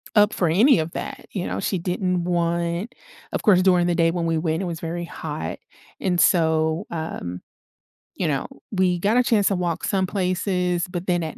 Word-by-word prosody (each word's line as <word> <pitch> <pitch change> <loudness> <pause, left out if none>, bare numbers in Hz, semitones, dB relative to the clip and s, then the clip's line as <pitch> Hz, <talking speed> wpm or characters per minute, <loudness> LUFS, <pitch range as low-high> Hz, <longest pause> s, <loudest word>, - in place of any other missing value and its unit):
up 210 0 +5
for 175 -3 +1
any 225 - +5
of 160 +1 -2
that, 275 +7 -6
you 185 -4 -3
know, - - -3
she 190 - -1
didn't 180 0 -1
want 170 +5 -1 0.4
of - - -3
course 190 -5 +5
during 180 -2 +4
the 175 - +2
day 165 -1 +3
when 170 -1 -2
we 165 -1 +1
went, 160 +1 -1
it - - -2
was 170 -2 -4
very 170 +1 -4
hot, 150 - -5 0.4
and 180 -2 +1
so, 160 +1 +2
um, 160 - -5 0.7
you 175 - -1
know, 140 -3 -1 0.3
we 185 -3 +1
got 205 +5 +2
a 250 - +5
chance 215 -4 +3
to 195 - +2
walk 175 -2 -2
some 190 -1 +1
places, 180 -2 0
but 180 0 -5
then 175 -2 +1
at 155 - -6
175 Hz, 200 wpm, -23 LUFS, 165-190 Hz, 0.7 s, up